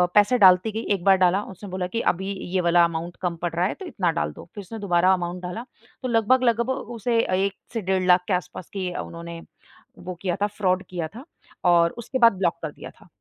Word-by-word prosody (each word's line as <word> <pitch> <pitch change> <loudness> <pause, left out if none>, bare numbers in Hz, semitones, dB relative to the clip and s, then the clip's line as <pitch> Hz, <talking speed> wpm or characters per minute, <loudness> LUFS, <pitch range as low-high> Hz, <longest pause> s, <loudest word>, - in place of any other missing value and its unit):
पैसे 210 +4 +5
डालती 185 +1 +6
गई 220 +2 -4
1 180 - -8
बार 195 0 +5
डाला। 185 +1 +3
उसने 195 +2 -10
बोला 185 -1 -3
कि 230 +5 -2
अभी 190 +3 -5 0.2
ये 185 - +2
वाला 170 0 +6
अमाउंट 170 +1 -4
कम 175 -2 -1
पड़ 175 - -1
रहा 175 - +2
है - - -3
तो 385 - -9
इतना 180 - 0
डाल 75 0 -1
दो। - - -11
फ़िर 205 - -6
उसने 220 +4 -8
दोबारा 185 -2 +3
अमाउंट 180 0 -3
डाला। 180 +7 -5 0.4
तो - - -1
लगभग 235 +3 +3
लगभग 235 0 +2 0.3
उसे 230 +1 +1 0.3
1 200 - -2 0.2
से 225 - -2
डेढ़ 185 0 0
लाख 180 0 +5
के 195 - 0
आसपास 180 -1 -4
की 185 -2 -3
उन्होंने, 170 0 -7 0.6
वो 185 0 -7
किया 180 -3 -1
था - - +3
फ्रॉड 185 -2 0
किया 175 -3 -3
था 250 +4 -9 0.5
और 170 -1 +4
उसके 240 +2 -4
बाद 230 -3 +7
ब्लॉक 170 -3 0
कर 155 - -3
दिया - - -10
था। - - -18
185 Hz, 230 wpm, -24 LUFS, 175-210 Hz, 0.6 s, बाद